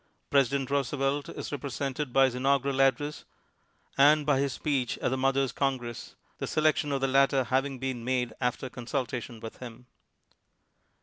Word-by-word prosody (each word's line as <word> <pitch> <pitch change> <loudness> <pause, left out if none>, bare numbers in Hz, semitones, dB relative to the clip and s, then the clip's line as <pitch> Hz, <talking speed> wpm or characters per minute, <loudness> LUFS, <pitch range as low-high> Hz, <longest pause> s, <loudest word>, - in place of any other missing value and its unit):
Presi 140 -4 +4
dent 140 -1 -2
Roosevelt 140 +1 0
is - - -6
represented 140 0 -3
by 135 +2 +5
his 130 - 0
inaugural 135 +1 +1
address 145 +2 +1 0.8
and 150 +1 +6
by 145 -2 +3
his 140 0 0
speech 135 -5 -1
at - - -1
the - - +1
Mothers' 135 0 +1
Con 135 -1 0
gress, 120 -2 -8 0.2
the - - -3
selection 155 -1 +1
of 135 -1 -1
the 135 - +2
latter 135 0 +3
having 135 +2 0
been 130 -2 -4
made 125 -2 -1
after 125 +1 -1
consultation 125 -2 -4
with 110 0 -8
him. 125 -1 -10
135 Hz, 165 wpm, -28 LUFS, 125-140 Hz, 0.8 s, and